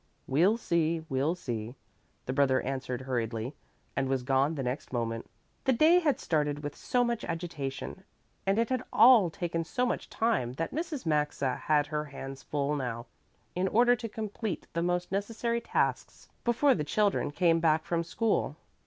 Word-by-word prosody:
"We'll 180 +11 +3
see, 165 -6 0
we'll 135 +6 +1
see," 120 -7 -5 0.5
the 130 - -2
brother 135 -2 +3
answered 130 -1 -3
hurriedly, 120 -1 -2 0.4
and 135 -1 0
was 135 -2 0
gone 135 +4 +2
the 135 - -3
next 125 +3 -4
moment. 115 -2 -3 0.4
The 265 - +4
day 320 +8 +6
had 295 -7 +1
started 150 -2 0
with 145 0 -4
so 250 -1 +1
much 235 -2 -1
agitation 165 0 -5 0.4
and 195 +2 +3
it 230 0 +2
had 255 -2 0
all 230 -7 +7
taken 165 0 -2
so 250 +10 -1
much 245 - -2
time 220 - 0
that 165 +5 -3
Mrs. 310 - -3
Maxa 150 -4 0
had 150 -1 +2
her 150 0 -3
hands 135 -2 -8
full 145 +2 -1
now 120 -4 -3 0.5
in 180 +2 0
order 240 +5 +5
to 230 -1 -5
complete 215 -3 -4
the 170 - 0
most 180 +1 -1
necessary 230 +4 -1
tasks - - -1
before 245 +4 +4
the 155 - -1
children 205 +6 +1
came 165 +2 +3
back 160 -1 +3
from 170 -1 0
school. 215 +6 0
165 Hz, 170 wpm, -30 LUFS, 135-215 Hz, 0.5 s, all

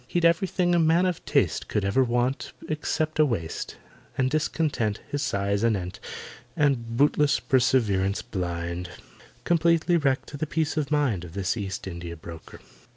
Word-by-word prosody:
He'd 175 +3 +1
everything 175 +1 +2
a 175 - +4
man 165 +3 +4
of 180 -3 -1
taste - - +1
Could 105 - -1
ever 100 +7 +3
want, 120 +2 -1
except 155 0 -1
a - - +8
waist; 100 - -3 0.4
And 130 0 +1
discontent 150 -8 0
His 145 -1 -1
size 100 -6 0
anent, 95 -6 0 0.6
And 120 -6 +1
bootless 145 +1 +3
perseverance 105 -7 +2
blind, 85 -1 -4 0.5
Completely 170 0 +3
wrecked 140 -1 0
the 155 - -1
peace 155 0 -1
of 150 -3 -1
mind 140 - +1
Of 85 -2 -10
this 100 +1 -1
East 100 0 -4
India 85 -2 -6
broker. 80 0 -11
130 Hz, 150 wpm, -26 LUFS, 100-155 Hz, 0.6 s, a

